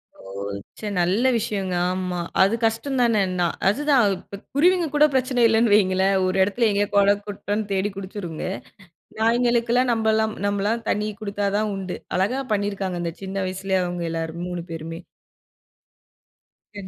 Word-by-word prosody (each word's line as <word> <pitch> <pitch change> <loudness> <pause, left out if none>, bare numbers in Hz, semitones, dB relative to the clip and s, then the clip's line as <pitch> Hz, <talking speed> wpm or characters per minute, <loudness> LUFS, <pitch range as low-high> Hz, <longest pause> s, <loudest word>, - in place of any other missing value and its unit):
ஓ! - - -22 0.6
ச்ச 215 - -5
நல்ல 185 +8 +2
விஷயங்க 200 -4 -2 0.2
ஆமா. 185 -1 -3 0.2
அது 195 +4 +4
கஷ்டந்தான 235 0 +1
எண்ணா 180 -1 0 0.2
அதுதான். 280 +3 +3
இப்போ 200 - -10 0.2
குருவிங்க 355 +3 +4
கூட 300 +1 +6
பிரச்சன 255 -2 +1
இல்லன்னு 225 -1 +3
வையுங்களேன், 190 -1 +3
ஒரு 185 +1 0
இடத்துல 220 +4 +1
எங்கேயோ 205 0 +1
கொளம், 200 0 +4
குட்டன்னு 205 +1 -3
தேடி 195 +2 0
குடிச்சுருங்க. 185 -4 -6 0.7
நாய்களுக்கெல்லாம் 240 +2 +2
நம்மலாம் 220 -1 +1
நம்மலாம் 205 +3 -1
தண்ணி 210 +1 0
குடுத்தா 205 -1 -2
தான் 215 0 0
உண்டு. 190 -2 -5 0.2
அழகா 235 +9 +1
பண்ணியிருக்காங்க. 200 -3 -2
அந்த 170 -1 -3
சின்ன 195 +1 -5
வயசுலயே 190 +1 -1
அவங்க 175 -1 -3
எல்லாரும் 165 +1 -4
3 175 -1 -4
பேருமே. 165 +1 -6 1.7
சரி. 200 -2 -8
205 Hz, 140 wpm, -23 LUFS, 185-230 Hz, 1.7 s, கூட